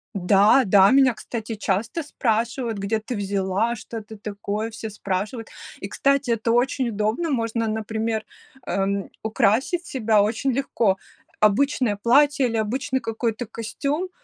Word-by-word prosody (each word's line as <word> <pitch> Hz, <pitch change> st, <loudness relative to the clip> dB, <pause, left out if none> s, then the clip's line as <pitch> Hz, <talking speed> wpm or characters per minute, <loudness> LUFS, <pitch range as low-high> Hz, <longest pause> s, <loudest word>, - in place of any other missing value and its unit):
Да-да, 200 Hz, +1 st, +5 dB
меня, 265 Hz, -2 st, +5 dB
кстати, 225 Hz, -1 st, -6 dB
часто 210 Hz, -, -1 dB
спрашивают: 235 Hz, -3 st, -1 dB
"Где 210 Hz, +3 st, -1 dB
ты 230 Hz, +3 st, -5 dB
взяла? 200 Hz, +3 st, 0 dB
Что 230 Hz, 0 st, -8 dB
это 220 Hz, 0 st, -9 dB
такое?" 210 Hz, +2 st, -4 dB
Все 220 Hz, 0 st, -6 dB
спрашивают. 205 Hz, +3 st, -4 dB, 0.3 s
И, -, -, -5 dB
кстати, 275 Hz, -2 st, +1 dB
это 230 Hz, 0 st, 0 dB
очень 245 Hz, +1 st, +1 dB
удобно. 220 Hz, +10 st, -1 dB
Можно, 230 Hz, -3 st, -1 dB
например, 220 Hz, 0 st, -2 dB, 0.4 s
эм, 195 Hz, 0 st, -1 dB
украсить 235 Hz, -, +1 dB
себя 220 Hz, -5 st, +2 dB
очень 235 Hz, +5 st, 0 dB
легко. 235 Hz, -6 st, +1 dB, 0.4 s
Обычное 220 Hz, +1 st, +2 dB
платье 275 Hz, +5 st, +3 dB
или 230 Hz, -1 st, -2 dB
обычный 260 Hz, +5 st, -1 dB
какой-то 225 Hz, +1 st, -2 dB
костюм- 280 Hz, -, -3 dB
225 Hz, 130 wpm, -23 LUFS, 210-250 Hz, 0.4 s, Да-да